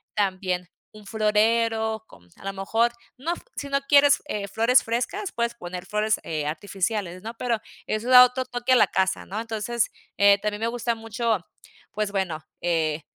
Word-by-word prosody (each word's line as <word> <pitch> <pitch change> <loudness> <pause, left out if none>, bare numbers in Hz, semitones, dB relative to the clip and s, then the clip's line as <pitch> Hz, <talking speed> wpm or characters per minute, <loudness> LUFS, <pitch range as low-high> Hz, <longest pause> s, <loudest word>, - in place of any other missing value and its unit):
También. 185 -3 -1 0.3
Un 215 -1 -14
florero, 220 +1 +1
con 90 - -19
a - - -17
lo 195 - -2
mejor, 220 +5 +1 0.3
no 295 +7 -2
f - - -9
si 285 - -5
no 275 0 +2
quieres, 285 0 +6
eh, 200 -6 -3
flores 230 +5 +4
frescas, 250 - -2
puedes 235 0 -1
poner 180 -3 -7
flores, 210 +1 0
eh, 155 -2 -3
artificiales, 185 +3 -3
¿no? 225 +1 -5
Pero 235 -2 0 0.3
eso 215 +3 -2
da 250 0 +10
otro 250 +1 -2
toque 245 +1 0
a - - +7
la 245 - +5
casa, 190 0 0
¿no? 205 +3 -5
Entonces, 225 +1 -1 0.3
eh, 200 0 +6
también 210 0 -2
me 225 - 0
gusta 235 0 -1
mucho, 225 0 -1 0.6
pues 210 -1 -1
bueno, 185 -6 -2 0.2
eh 160 -3 0
215 Hz, 180 wpm, -25 LUFS, 195-235 Hz, 0.6 s, da